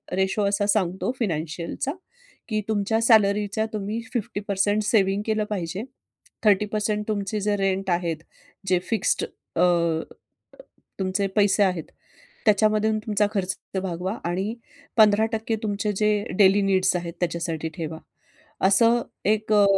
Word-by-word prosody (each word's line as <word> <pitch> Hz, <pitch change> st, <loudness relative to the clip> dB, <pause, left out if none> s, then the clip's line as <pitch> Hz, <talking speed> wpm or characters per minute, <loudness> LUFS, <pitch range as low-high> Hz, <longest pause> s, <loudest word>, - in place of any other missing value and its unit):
Ratio 190 Hz, +2 st, +1 dB
असा 205 Hz, 0 st, 0 dB
सांगतो 190 Hz, -1 st, +1 dB
फिनॅन्शियलचा 170 Hz, -, -2 dB, 0.6 s
की 215 Hz, -1 st, 0 dB
तुमच्या 220 Hz, +1 st, +1 dB
सॅलरीचा 210 Hz, -2 st, +3 dB
तुम्ही 215 Hz, +2 st, -3 dB
50% 205 Hz, -2 st, -1 dB
सेव्हिंग 200 Hz, -2 st, +2 dB
केलं 215 Hz, -1 st, 0 dB
पाहिजे. 185 Hz, -1 st, -3 dB, 0.6 s
30% 210 Hz, +1 st, +1 dB
तुमचे 210 Hz, 0 st, -2 dB
जे 205 Hz, +1 st, +1 dB
रेंट 195 Hz, -1 st, 0 dB
आहेत, 170 Hz, -2 st, 0 dB, 0.5 s
जे 185 Hz, -1 st, +3 dB
फिक्स्ड 225 Hz, -4 st, +1 dB, 0.3 s
अ, -, -, +1 dB
अ, 170 Hz, -2 st, +3 dB, 1.0 s
तुमचे 190 Hz, +1 st, 0 dB
पैसे 205 Hz, -1 st, +4 dB
आहेत 180 Hz, -4 st, 0 dB, 0.6 s
त्याच्यामधून 215 Hz, +1 st, +3 dB
तुमचा 210 Hz, -1 st, +1 dB
खर्च 190 Hz, -2 st, -1 dB, 0.3 s
भागवा 185 Hz, +2 st, -3 dB
आणि 190 Hz, +6 st, -1 dB, 0.4 s
15% 220 Hz, +1 st, +3 dB
तुमचे 210 Hz, 0 st, -1 dB
जे 210 Hz, +1 st, +2 dB, 0.3 s
डेली 200 Hz, 0 st, +6 dB
नीड्स 190 Hz, -2 st, +2 dB
आहेत, 170 Hz, -1 st, -4 dB
त्याच्यासाठी 165 Hz, -2 st, -2 dB
ठेवा. 160 Hz, -2 st, -5 dB, 0.7 s
असं 230 Hz, +4 st, +4 dB, 0.2 s
एक 215 Hz, +1 st, +1 dB
अ, 205 Hz, -1 st, +6 dB
200 Hz, 120 wpm, -24 LUFS, 185-215 Hz, 1.0 s, डेली